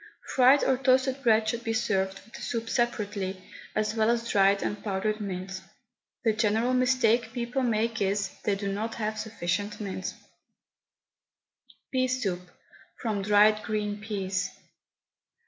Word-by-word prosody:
Fried 265 +2 +6
or 260 -1 +2
toasted 260 +1 +2
bread 220 -3 +3
should 235 +2 -2
be 225 - -1
served 195 -3 0
with 225 - -22
the - - -9
soup 230 -1 -3
separately, 205 -5 -1 0.4
as 215 0 0
well 220 0 +2
as 235 0 +1
dried 195 -1 +3
and 205 - -3
powdered 215 +1 -1
mint. 190 -1 -5 0.6
The 225 -2 +3
general 220 +3 +1
mistake 250 -2 +2
people 245 +2 -2
make 230 -2 0
is, 200 0 0
they 205 - +1
do 195 0 -3
not 220 +3 -3
have 215 -1 -2
sufficient 205 -1 -2
mint. 195 -3 -4 1.8
PEA 255 -1 +2
SOUP, 205 -9 -1 0.6
FROM 215 -4 -2
DRIED 210 +1 +5
GREEN 210 -1 -2
PEAS. 195 -3 -2
215 Hz, 140 wpm, -28 LUFS, 200-235 Hz, 1.8 s, Fried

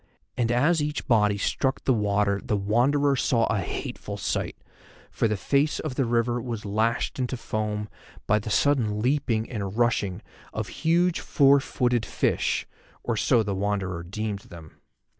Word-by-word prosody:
And 120 -2 0
as 150 +7 +3
each 150 +1 -3
body 105 -5 +3
struck 130 +6 -1
the 130 - +3
water 100 -2 +1
the 105 - 0
Wanderer 135 +8 +2
saw 115 -3 +2
a 105 - 0
hateful 95 - -5
sight, - - -2 0.5
for - - +1
the 105 -1 -1
face 140 +8 +1
of 155 -4 -3
the 130 0 0
river 120 +1 +1
was 115 -3 -5
lashed 110 +5 0
into 125 0 -2
foam 105 -2 -3 0.4
by 105 - +3
the 110 - -6
sudden 110 -4 +2
leaping 120 -2 0
and 105 -3 -5
rushing 115 -6 +1 0.3
of - - -3
huge 170 +2 +1
four 140 -2 +4
footed 125 -3 0
fish, - - 0 0.4
or - - -1
so 115 -2 +3
the 100 -1 -2
Wanderer 95 -3 -2
deemed 100 +3 -4
them. 85 -5 -14
115 Hz, 160 wpm, -26 LUFS, 105-130 Hz, 0.5 s, four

